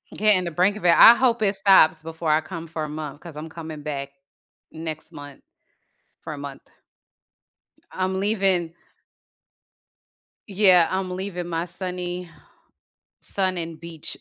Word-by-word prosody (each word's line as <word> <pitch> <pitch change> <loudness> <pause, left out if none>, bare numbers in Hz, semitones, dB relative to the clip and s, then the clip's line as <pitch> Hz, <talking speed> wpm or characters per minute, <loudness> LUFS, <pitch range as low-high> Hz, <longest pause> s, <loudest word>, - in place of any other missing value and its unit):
Getting 210 -3 +3
the 170 - -4
brink 185 +6 +2
of 215 - -8
it, 170 - +5
I 230 - +10
hope 240 -2 +1
it 200 0 +2
stops 195 -5 +5
before 160 0 -3
I 155 - +3
come 165 0 -8
for 160 -1 -5
a 150 - -5
month, 150 -2 -7
'cause 165 -3 -10
I'm 155 - -6
coming 160 -2 -9
back 140 -2 -4 0.6
next 160 0 -7
month 145 -3 -11 0.8
for 155 - -7
a - - -9
month. 140 -1 -8 1.3
I'm 190 0 -2
leaving 190 -5 +1 1.7
yeah, 185 -4 +4
I'm 185 -1 -2
leaving 180 -2 -5
my 170 0 -2
sunny 180 0 -5 0.9
sun 185 -2 -2
and 165 -1 -6
beach 170 -2 -8
170 Hz, 145 wpm, -23 LUFS, 155-190 Hz, 1.7 s, I